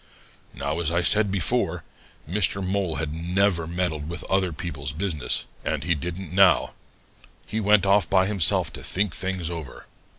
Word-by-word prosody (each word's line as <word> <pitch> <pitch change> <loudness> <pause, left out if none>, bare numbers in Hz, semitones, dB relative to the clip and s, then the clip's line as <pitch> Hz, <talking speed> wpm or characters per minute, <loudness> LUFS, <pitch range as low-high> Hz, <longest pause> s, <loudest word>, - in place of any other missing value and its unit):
"Now, 70 +3 -2
as 80 -2 0
I 85 +1 +1
said 105 +3 +5
before, 95 -3 0 0.4
Mr. 95 +1 +1
Mole 95 -3 -1
never 85 +1 0
had - - -7
meddled 80 -4 -2
with 85 - -5
other 95 -2 0
people's 75 -4 -5
business, 80 -2 -1 0.2
and - - -2
he 85 - +1
didn't 85 +3 -5
now. 95 0 +4 0.7
He 110 - -3
went 105 -2 +4
off 100 -2 +3
by 95 -1 +4
himself 100 -4 +1
to - - -8
think 100 -2 0
things 95 -3 -3
over. 80 -4 -8
90 Hz, 160 wpm, -25 LUFS, 80-95 Hz, 0.7 s, said